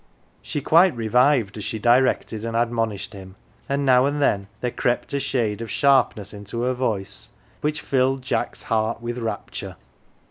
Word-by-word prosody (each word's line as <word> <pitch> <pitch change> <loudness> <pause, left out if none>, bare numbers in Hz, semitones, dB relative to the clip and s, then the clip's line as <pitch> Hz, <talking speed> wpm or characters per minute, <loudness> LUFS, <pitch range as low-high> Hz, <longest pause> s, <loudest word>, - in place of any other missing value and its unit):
She 145 - -4
quite 165 +2 +5
revived 120 -1 +2
as - - -5
she 110 - -3
directed 120 -1 +2
and 115 0 -2
admonished 115 -3 -1
him, 95 -1 -11 0.3
and 140 0 0
now 130 0 +5
and 145 +1 -1
then 100 -8 +1
there 125 - -2
crept 120 +4 -1
a 140 - +1
shade 115 -6 -1
of 115 - -5
sharpness 125 -8 +2
into 105 +3 -5
her 130 +1 +1
voice 105 -6 -3 0.3
which 150 0 -1
filled 130 0 +1
Jack's 130 - -2
heart 110 0 0
with 120 +1 -4
rapture. 115 -1 -5
120 Hz, 165 wpm, -23 LUFS, 110-130 Hz, 0.3 s, quite